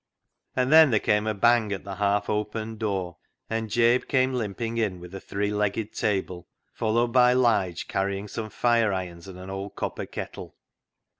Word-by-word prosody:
And 130 +1 +1
then 160 -2 +8
there 110 -4 +3
came 105 +1 +1
a 110 - +1
bang 115 0 +3
at 100 - -4
the 100 -1 -7
half 100 0 +1
opened 105 +1 -3
door, 95 -6 -2 0.3
and 110 0 -2
Jabe 120 +2 +3
came 130 -1 +2
limping 115 0 -3
in 100 -5 -1
with 90 +1 -11
a 95 - -5
three 100 +1 -2
legged 105 +1 -1
table, 95 -4 -2 0.3
followed 115 +2 +1
by 125 -1 +6
Lige 100 -9 +1
carrying 100 +1 -2
some 110 +1 -5
fire 115 -2 +2
irons 90 -2 -5
and 95 -1 -9
an 95 +1 -8
old 95 +1 -6
copper - - -4
kettle. - - -7
105 Hz, 175 wpm, -26 LUFS, 95-115 Hz, 0.3 s, then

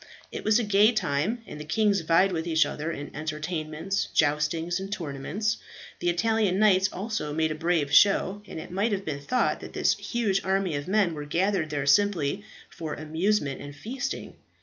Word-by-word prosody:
It - - -6
was 215 0 +4
a 240 - +1
gay 210 +2 +4
time; 200 +4 -1
and 150 - -9
the - - -5
kings 205 +5 +2
vied 170 +4 +3
with 165 -1 -2
each 160 -2 +3
other 150 +3 -4
in 145 -2 -6
entertainments, 155 +3 -3
joustings, 160 +3 +1
and 195 +1 -6
tournaments. 180 +5 -2 0.4
The 175 - 0
Italian 200 +2 +1
knights 195 -2 +4
also 195 -7 -3
made 160 0 +1
a - - 0
brave 155 -2 0
show, 200 +1 +4
and - - -7
it 160 - -9
might 205 +4 0
have 195 -1 -3
been 140 -2 -4
thought 250 - 0
that - - -10
this - - +2
huge 215 -5 -1
army 190 -2 0
of 145 +2 -4
men 195 -3 +2
were 150 -1 -6
gathered 175 +1 0
there 145 -2 -2
simply 190 +2 +2 0.2
for 160 -4 -6
amusement 155 -1 -1
and 145 0 -9
feasting. 265 - -5
175 Hz, 185 wpm, -27 LUFS, 155-205 Hz, 0.4 s, was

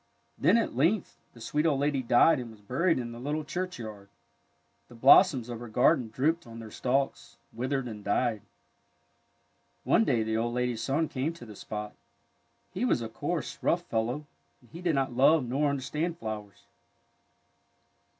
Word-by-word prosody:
Then 215 - +4
at 230 - -1
length 170 - +1
the 120 - -15
sweet 150 +7 0
old 140 -4 +1
lady 140 -1 +1
died 125 +5 +4
and 120 -2 -6
was 110 -2 -14
buried 135 - +1
in 120 -2 -4
the 120 - -9
little 150 +4 -2
churchyard. 120 - -6 0.8
The 120 - -15
blossoms 130 - +6
of 120 -2 -6
her 120 - -8
garden 125 +2 +3
drooped 155 +7 0
on 115 0 -10
their 110 -1 -9
stalks, 135 +4 -2 0.2
withered, 130 +2 -2
and 105 -3 -8
died. 110 +1 0 1.4
One - - +4
day 115 -3 +1
the 110 0 -1
old 120 +1 -1
lady's 125 -2 -1
son 140 +7 0
came 145 +5 -2
to 165 - -12
the 105 -2 -11
spot. 105 +1 -6 0.8
He 190 +5 -3
was 180 - +1
a 115 - -5
coarse, 110 - -4
rough - - +1
fellow, 120 +7 -2 0.3
and 120 -3 -24
he 170 - -9
did 170 -4 +1
not 135 -2 0
love 135 +2 +4
nor 140 +4 +1
understand 150 +5 -2
flowers. 105 - -7
125 Hz, 170 wpm, -29 LUFS, 115-150 Hz, 1.4 s, blossoms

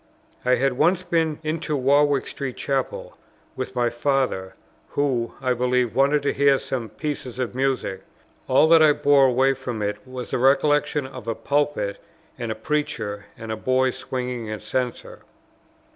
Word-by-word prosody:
I 125 0 +4
had 130 0 0
once 175 +4 +3
been 165 -3 0
into 155 -1 -2
Warwick 140 +1 +3
Street 135 -3 -5
Chapel, 135 -2 -3 0.4
with 130 0 -5
my 120 -1 +1
father, 120 -7 -1 0.3
who, 130 -5 -1
I 125 - +1
believe, 125 -2 +1
wanted 140 +2 +3
to 140 - +1
hear 140 -1 +4
some 120 -4 -4
piece 145 +5 -4
of 125 0 -4
music; 130 -7 -1 0.5
all 135 +4 +5
that 165 -1 +7
I 155 -1 +6
bore 140 -2 +4
away 130 +2 +3
from 125 -5 -5
it 105 0 -1
was 130 -1 -7
the - - 0
recollection 145 +2 +3
of 130 -4 -10
a 115 - -1
pulpit 145 -8 -1 0.4
and 115 -2 -3
a - - -3
preacher, 110 -6 -3
and 115 -1 -7
a - - -1
boy 130 +3 +1
swinging 125 -3 -4
a 110 -1 -4
censer. 125 +1 -4
130 Hz, 160 wpm, -23 LUFS, 120-145 Hz, 0.5 s, that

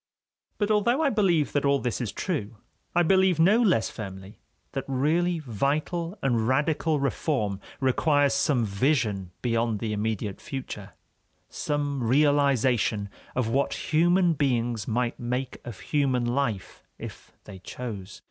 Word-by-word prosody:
But 205 0 0
although 235 +8 +2
I 280 - +3
believe 180 -8 +2
that 145 - 0
all 140 0 +3
this 125 -2 -2
is 115 - -2
true, 120 - -3 0.4
I 175 - +5
believe 190 -1 +3
no 200 +8 +5
less 180 - +2
firmly 95 0 -8 0.3
that 135 - -3
really 160 +7 +1
vital 155 - -2
and 120 -4 +1
radical 150 +3 +1
reform 130 -7 -1 0.2
requires 145 +2 +2
some 125 -6 +2
vision 105 - 0
beyond 115 -2 +1
the 105 +1 -3
immediate 105 -1 -3
future, 105 -8 -7 0.6
some 145 -2 -2
realization 130 -5 +2 0.3
of 125 -3 0
what 140 +7 -1
human 175 +2 +4
beings 120 -7 0
might 120 +1 -1
make 125 +2 -3
of 120 -5 -8
human 135 -5 0
life 120 -5 -2
if - - -10
they 100 -2 -11
chose. 100 -3 -7
135 Hz, 135 wpm, -26 LUFS, 115-155 Hz, 0.6 s, I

